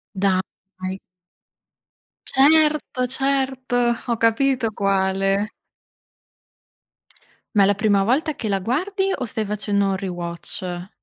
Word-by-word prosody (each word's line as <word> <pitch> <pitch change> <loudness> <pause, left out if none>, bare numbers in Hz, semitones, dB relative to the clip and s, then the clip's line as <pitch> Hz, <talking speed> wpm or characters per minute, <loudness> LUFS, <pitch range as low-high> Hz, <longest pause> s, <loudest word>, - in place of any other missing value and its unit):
Dai. 190 0 -2 1.3
Certo, 300 -2 +3
certo, 265 -1 -1 0.3
ho 235 -1 0
capito 230 +1 +2
quale. 195 +1 +1 2.1
Ma 200 - +6
è - - +6
la 205 - +3
prima 205 -2 +2
volta 295 +8 +1
che 220 - -4
la 195 -1 +1
guardi 380 - -1
o 250 - -4
stai 220 -1 -2
facendo 205 -1 0
un 195 -1 0
rewatch? 175 0 -5
210 Hz, 105 wpm, -22 LUFS, 195-265 Hz, 2.1 s, Ma